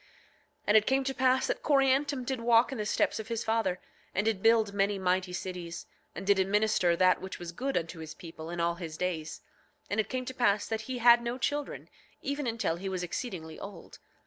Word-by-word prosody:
9:23 - - -28 0.6
And 210 - +6
it 215 - +3
came 270 +1 +3
to 270 0 -2
pass 260 0 +3
that - - -2
Coriantum 275 -1 +2
did 260 -2 -2
walk 235 +2 +4
in 260 - -5
the 210 - -2
steps - - +1
of 220 - -6
his 230 -1 -2
father, 220 -5 0 0.4
and 195 - +1
did 220 -4 0
build 225 -2 +4
many 200 0 +1
mighty 185 -1 0
cities, 180 -2 -5 0.3
and - - -6
did 200 0 +4
administer 195 -2 +2
that 185 +1 +3
which 190 0 -6
was 175 -1 -7
good 265 +10 -2
unto 165 0 -4
his 160 -1 -8
people 165 -1 -9
in 175 0 -5
all 170 0 +2
his 165 -2 -7
days. 160 -4 -3 0.5
And 205 - 0
it 215 - 0
came 255 0 -3
to 260 - -5
pass 215 -5 +2
that 220 +1 -4
he 255 - -2
had 240 0 +7
no 235 +1 -3
children 290 +2 -2 0.4
even 280 -1 -2
until 225 -8 -1
he 190 +2 -4
was 185 -1 -3
exceedingly 170 -4 -5
old. 200 -4 -10
210 Hz, 220 wpm, -30 LUFS, 180-245 Hz, 0.6 s, had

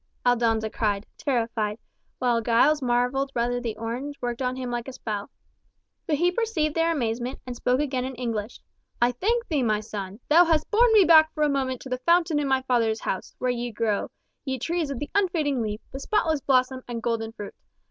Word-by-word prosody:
Aldonza 225 -3 +2
cried, 205 -2 -1
terrified, 225 -5 -1 0.4
while 240 -2 +1
Giles 250 +7 +3
marvelled 250 +2 +1
whether 245 +1 0
the 230 -3 -4
orange 250 +6 -4
worked 240 0 -3
on 255 0 -1
him 255 -1 -4
like 240 0 -3
a 265 - -6
spell. 210 -4 -5 0.8
But 310 - +2
he 350 +4 +2
perceived 360 -8 0
their 330 +1 +2
amazement, 245 -3 -2
and 250 -1 -6
spoke 250 +2 +1
again 265 -4 -1
in 260 0 -5
English, 230 -3 -4 0.4
"I 240 +1 +4
thank 460 - 0
thee, 305 -6 0
my 215 -3 +1
son! 205 -1 -7
Thou 330 +4 +7
hast 320 -2 +1
borne 470 +2 +5
me 420 -3 +7
back 315 -2 +6
for 305 - +1
a 300 - +3
moment 260 -3 -1
to 265 - -9
the 255 0 -2
fountain 335 +1 +3
in 290 - -1
my 265 -1 +1
father's 230 -4 +1
house, 190 - -4
where 250 0 0
ye 240 0 -3
grow, 215 -2 -1 0.3
ye 265 -2 -2
trees 330 +4 -2
of 275 - -3
the 290 - -6
unfading 320 -9 +1
leaf, 210 -1 -3
the 270 - -6
spotless 320 -4 0
blossom, 255 -1 +2
and 235 -1 -5
golden 225 -1 -1
fruit! 210 -3 -8
255 Hz, 200 wpm, -25 LUFS, 230-295 Hz, 0.8 s, Thou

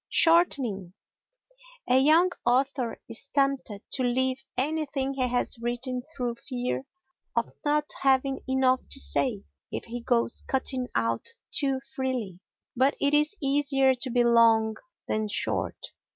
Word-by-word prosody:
Shortening 260 - +2 0.9
A 250 +1 +5
young 320 +6 +5
author 255 0 0
is 230 +4 -2
tempted 275 -7 0
to 260 - 0
leave 260 +1 0
anything 275 -1 -1
he 260 -2 0
has 245 -1 0
written 245 +2 -3
through 250 -5 -5
fear 250 0 -3 0.5
of 235 -1 0
not 295 0 +1
having 270 0 +2
enough 260 -1 +3
to 275 - 0
say 230 -7 +1 0.3
if - - -5
he 235 +1 -6
goes 235 -1 0
cutting 260 -1 0
out 115 0 0 0.2
too 270 -2 +1 0.2
freely. 250 -9 -3 0.4
But 265 +3 +3
it 285 +1 +1
is 300 +6 +3
easier 275 -1 +3
to 255 +1 -2
be 245 0 +2
long 230 -2 +4 0.3
than 215 0 -1
short. 210 - -1
260 Hz, 135 wpm, -27 LUFS, 240-275 Hz, 0.9 s, A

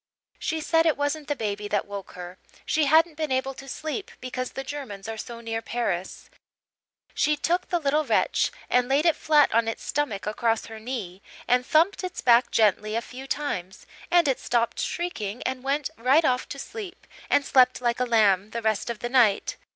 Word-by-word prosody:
She 320 0 -2
said 325 +1 +3
it 315 - +2
wasn't 290 +1 -2
the 290 - -1
baby 210 -3 -3
that - - 0
woke 200 -1 -8
her 180 +1 -9 0.3
she 310 -1 +2
hadn't 315 +2 +4
been 310 -3 -2
able 260 +1 0
to 270 +1 -11
sleep 315 +9 -4
because 255 0 -5
the 270 - -5
Germans 260 -8 -7
are 225 - -4
so 230 +1 -8
near 225 -1 -3
Paris; 190 -7 -3 0.9
she 300 0 +1
took 350 +4 0
the 350 - +2
little 300 -1 +1
wretch 230 -7 +1 0.2
and 250 0 +2
laid 285 +4 +2
it 335 - +4
flat 300 -2 +3
on 230 0 +3
its 225 - -4
stomach 275 -9 -2
across 225 +1 0
her 220 -1 -9
knee 215 -6 -6 0.3
and 250 +1 +3
thumped 340 +6 +3
its 365 -1 -5
back 240 0 +5
gently 215 0 +2
a 230 - 0
few 260 +2 -9
times, 190 -12 -4 0.2
and 345 -3 +4
it 265 - +1
stopped 235 -1 0
shrieking 245 - -3
and 260 -1 -3
went 280 +1 -1
right 265 +7 +4
off 250 -2 +1
to 280 - -6
sleep 405 +5 -8 0.2
and 285 - +3
slept 255 -1 +4
like 240 -1 0
a 250 - +2
lamb 210 -4 +3
the 235 +1 -4
rest 220 +1 0
of 235 -2 -5
the 240 - -3
night. 235 -6 +3
255 Hz, 195 wpm, -25 LUFS, 225-295 Hz, 0.9 s, back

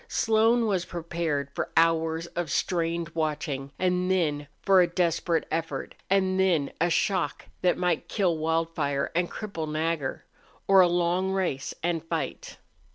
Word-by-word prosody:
Slone 225 - +3
was 190 -5 0
prepared 165 -5 -3
for - - -3
hours 165 0 +2
of 170 -1 -4
strained 170 +2 -1
watching, 150 -4 -3
and 180 0 +1
then 150 -6 0 0.2
a 185 -2 +6
desperate 170 -1 0
effort, 165 +1 -3 0.2
and 190 -1 +2
then 170 -7 +2
a 175 - +3
shock 175 -3 0 0.2
that 180 -1 +2
might 180 -3 0
kill 185 -6 +1
Wildfire 160 -3 -1
and 175 +1 +1
cripple 165 -8 -5
Nagger, 155 -3 -2 0.4
or 195 -1 +6
a 180 - +6
long 175 +2 +1
race 170 -8 -2
and 170 -2 0
fight. 165 - -4
170 Hz, 140 wpm, -27 LUFS, 160-185 Hz, 0.4 s, a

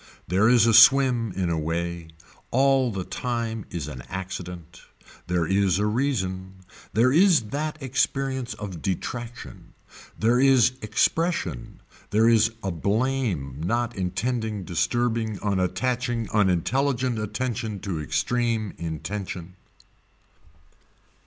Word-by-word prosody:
There 100 +5 +3
is 120 -3 +5
a 115 - +4
swim 120 -1 +6
in 90 -3 -1
a 80 - 0
way. 85 +1 -3 0.4
All 135 -1 +3
the 95 -3 -3
time 115 0 -3
is 85 -5 -5
an 65 -5 -7
accident. 90 -3 -7 0.5
There 90 -2 +1
is 95 0 +2
a 105 - +1
reason. 95 -6 -1 0.4
There 120 +4 +3
is 165 - +4
that 155 +1 -2
experience 130 -2 -1
of 95 -6 -7
detraction. 120 +5 -5 0.4
There 115 +3 +3
there - - +2
is 130 -2 +5
expression, 145 - -1 0.3
there 110 +3 +3
is 115 -1 +5
a 95 - -1
blame 100 - -1
not 120 +6 -1
intending 110 +2 -2
disturbing 110 +5 -1
unattaching 115 +5 -1
unintelligent 120 - +1
attention 110 -1 -3
to 90 -7 -3
extreme 115 +5 -1
intention. 85 +2 -5
110 Hz, 115 wpm, -25 LUFS, 90-125 Hz, 0.5 s, swim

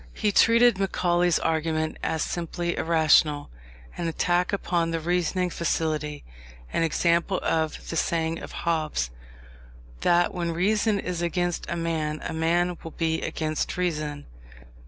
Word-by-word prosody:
He 210 - +1
treated 230 0 +5
Macaulay's 175 -3 +2
argument 160 -1 -1
as 160 - -1
simply 175 0 -3
irrational; 155 -2 +3 0.4
an 170 - -3
attack 175 +2 +1
upon 175 -4 0
the 165 0 -1
reasoning 180 +2 0
faculty; 155 -3 -2 0.5
an - - +1
example 170 +3 +1
of 160 -1 -1
the - - -3
saying 165 0 0
of - - -9
Hobbes, 155 - 0 0.9
that 175 0 +3
When 170 -2 -2
reason 205 +4 +2
is 180 -2 -3
against 175 0 -1
a - - -1
man, 160 -2 -2
a - - -4
man 170 +2 +1
will 165 - -6
be 160 0 -1
against 155 +1 -2
reason. 155 -5 -2
170 Hz, 135 wpm, -26 LUFS, 160-175 Hz, 0.9 s, treated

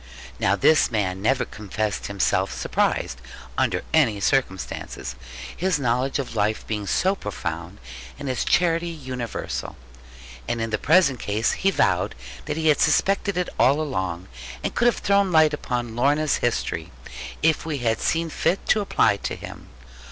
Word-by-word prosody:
Now 95 - +3
this 155 +10 +4
man 95 -5 -1
never 130 +5 +2
confessed 105 0 -3
himself 100 -1 +1
surprised, 60 -1 -1 0.3
under - - 0
any 120 -10 +3
circumstances; 95 - -1 0.4
his 185 -2 +1
knowledge 125 0 0
of 135 -4 -4
life 105 0 0
being 105 -2 -3
so 190 - +2
profound, 90 - -5 0.4
and 140 - -6
his 130 -1 -1
charity 170 -1 +2
universal. 130 -7 -5 0.7
And 120 - -1
in 115 0 -2
the 110 - 0
present 150 -5 +4
case 105 +3 0
he 195 - +1
vowed 195 - +1 0.3
that 150 0 -3
he 160 -1 +2
had 150 - +4
suspected 195 +5 +2
it 180 - 0
all 140 +4 +4
along, 95 - -3 0.4
and - - -2
could 240 - +2
have 240 - +3
thrown 200 -1 +2
light 155 -2 +5
upon 120 -5 -3
Lorna's 145 +4 +2
history, 120 -1 -1 0.5
if 160 -1 +3
we 160 -3 -3
had 115 -3 0
seen 165 0 0
fit 185 - 0
to 215 - +4
apply 190 - +2
to - - -4
him. - - -10
130 Hz, 155 wpm, -24 LUFS, 105-160 Hz, 0.7 s, light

